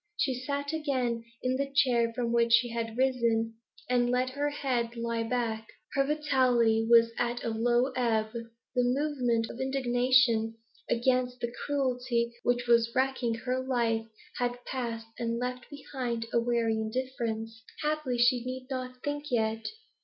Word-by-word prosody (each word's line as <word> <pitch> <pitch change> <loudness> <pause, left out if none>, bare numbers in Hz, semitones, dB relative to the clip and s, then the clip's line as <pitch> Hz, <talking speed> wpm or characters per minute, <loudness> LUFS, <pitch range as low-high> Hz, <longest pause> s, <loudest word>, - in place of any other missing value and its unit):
She 265 - +1
sat 280 +4 -3
again 255 -7 -1 0.2
in 255 0 +1
the 275 0 -2
chair 245 -5 +3
from 235 -1 -1
which 235 0 +3
she 235 +1 +5
had 230 -1 -4
risen, 235 -4 +1 0.3
and 245 -1 +2
let 250 +1 +1
her 290 +2 -1
head 250 -5 -1
lie 230 0 -2
back. 225 -2 -2 0.3
Her 275 - +3
vitality 255 -6 +2
was 230 -1 +6
at 240 0 -1
a - - -1
low 240 +3 +2
ebb; 220 -3 +1
the 230 +2 -4
movement 250 -3 +1
of 240 - -10
indignation 250 -3 +2 0.3
against 250 +1 +1
the 235 0 -3
cruelty 250 -4 0
which 245 0 +1
was 235 -1 +4
wrecking 260 -3 +1
her 255 0 0
life 230 -3 0 0.3
had 245 0 -2
passed 235 -3 -3
and 230 0 -1
left 250 +1 -4
behind 255 -5 -4
it 230 - -12
a 235 - +4
weary 230 -2 +1
indifference. 225 -1 -3 0.2
Happily 300 -5 0
she 245 0 +4
need 255 +1 -5
not 255 -1 -5
think 290 0 -3
yet. 225 -2 0
245 Hz, 155 wpm, -29 LUFS, 230-260 Hz, 0.3 s, was